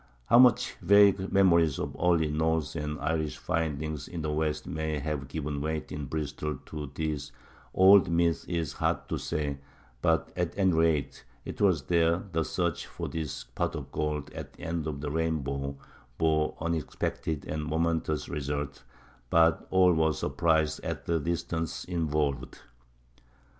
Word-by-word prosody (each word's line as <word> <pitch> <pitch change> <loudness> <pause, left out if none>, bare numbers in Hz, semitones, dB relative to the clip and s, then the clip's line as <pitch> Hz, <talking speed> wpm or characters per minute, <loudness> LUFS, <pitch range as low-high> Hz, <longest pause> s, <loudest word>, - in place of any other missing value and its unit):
How 120 - +6
much 125 -3 +5
vague 100 -1 +5
memories 85 -6 +4
of - - -4
early 85 -4 +3
Norse 80 0 0
and 75 -1 -3
Irish 80 -2 -1
findings 75 -2 -2
in 85 -3 -5
the 75 - -1
west 75 0 -1
may 80 -1 -2
have 75 -2 -3
given 70 0 -4
weight 80 -1 -3
in 75 -1 -4
Bristol 75 0 -3
to 75 -2 -6
these 75 -3 -3 0.4
old 95 +1 +7
myths 85 -1 +2
is 85 -4 -2
hard - - -1
to - - -2
say; 70 -2 -2 0.4
but 80 0 +1
at 90 0 -2
any 95 -3 +3
rate 80 -3 +1 0.2
it - - -6
was 90 -9 +3
there 85 +1 +2
the 80 0 +1
search 85 0 -2
for - - -6
this 75 -4 -4
pot - - -3
of - - -7
gold 75 -1 -2
at - - -8
the - - -14
end 85 -2 -2
of 70 -2 -4
the 75 -1 -3
rainbow 70 -4 -2 0.4
bore 80 -1 +1
unexpected 80 -1 -2
and 75 0 -3
momentous 80 -1 0
results, 70 0 -4 0.5
but 80 +2 +3
all 95 -1 +5
were 80 -1 +2
surprised 80 +1 +1
at - - -4
the 85 -1 +1
distance 85 0 -3
involved. 75 -6 -1
80 Hz, 155 wpm, -29 LUFS, 75-85 Hz, 0.5 s, old